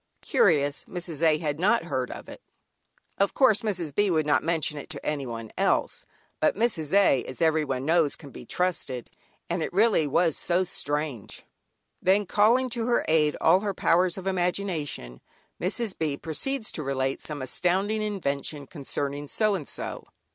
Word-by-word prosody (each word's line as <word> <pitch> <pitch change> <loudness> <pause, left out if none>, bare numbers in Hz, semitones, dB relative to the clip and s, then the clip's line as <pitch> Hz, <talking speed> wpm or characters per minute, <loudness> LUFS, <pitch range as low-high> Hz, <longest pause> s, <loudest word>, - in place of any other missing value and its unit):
Curious, 145 -5 +2
Mrs. 175 -4 -6
A. 160 -2 +4
had 150 -1 -3
not 210 +3 +3
heard 130 -6 -2
of - - -8
it. - - -10 0.8
Of 200 0 +2
course 250 -6 +5
Mrs. 180 - -2
B. 205 +6 +2
would 160 -4 +2
not 145 -1 +3
mention 155 -2 -1
it - - -10
to 145 -3 -6
anyone 120 -7 -3
else, - - +1 0.3
but - - +2
Mrs. 190 -9 0
A., 195 -10 +4
as 130 - -8
every 160 -1 +3
one 135 -2 -3
knows, 160 -2 +3
can 145 -4 -12
be - - -10
trusted, 130 -5 -2 0.4
and 170 0 -2
really 205 -4 +3
it 145 - -4
was 165 0 +3
so 180 +1 +1
strange. 145 - -3 0.6
Then 195 +3 +3
calling 230 +7 +3
to 230 -1 -1
her 240 - +2
aid 155 -2 +3
all 170 +3 +5
her 200 -1 -3
powers 175 +2 +2
of 190 - -7
imagination, 175 - -2 0.4
Mrs. 200 +3 -1
B. 150 -3 -1
proceeds 220 - -2
to - - -5
relate 135 -1 -1
some 145 -3 -5
astounding 190 +10 0
invention 150 -8 -3
concerning 145 0 -4
so 215 +7 +1
and 170 -8 -3
so. - - -6
165 Hz, 170 wpm, -26 LUFS, 145-195 Hz, 0.8 s, course